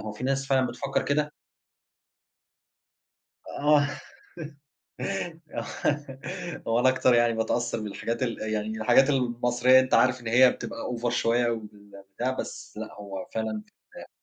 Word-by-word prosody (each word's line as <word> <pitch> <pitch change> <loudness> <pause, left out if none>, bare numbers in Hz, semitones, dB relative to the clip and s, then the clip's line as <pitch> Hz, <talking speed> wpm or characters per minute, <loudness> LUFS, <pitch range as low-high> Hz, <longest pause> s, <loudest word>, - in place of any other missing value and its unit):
هو 105 - -5
في 115 +4 -7
ناس 135 0 0
فعلًا 130 -2 +3
بتفكِّر 135 +3 -2
كده؟ 150 +1 0 2.2
آه. 145 0 +3 1.7
آه، - - -3 1.0
هو 115 +1 +2
أنا 130 - +5
أكتر 130 -1 +3
يعني 120 -1 +4
باتأثّر 115 +1 -1
بالحاجات 115 +4 -3
ال 120 -2 -2 0.2
يعني 105 0 -1
الحاجات 125 +5 +4
المصرية 125 -1 +3
أنت 130 0 0
عارف 130 0 +4
إن 115 - -7
هي 125 +2 +6
بتبقى - - -7 0.2
over 120 +1 -1
شوية 120 +1 +2
وال 105 -3 -8
بتاع 125 +4 0
بس - - -7
لأ، - - -6
هو 100 -2 -7
فعلًا 110 -1 -3 0.3
ف - - -10
120 Hz, 135 wpm, -27 LUFS, 110-130 Hz, 2.2 s, هي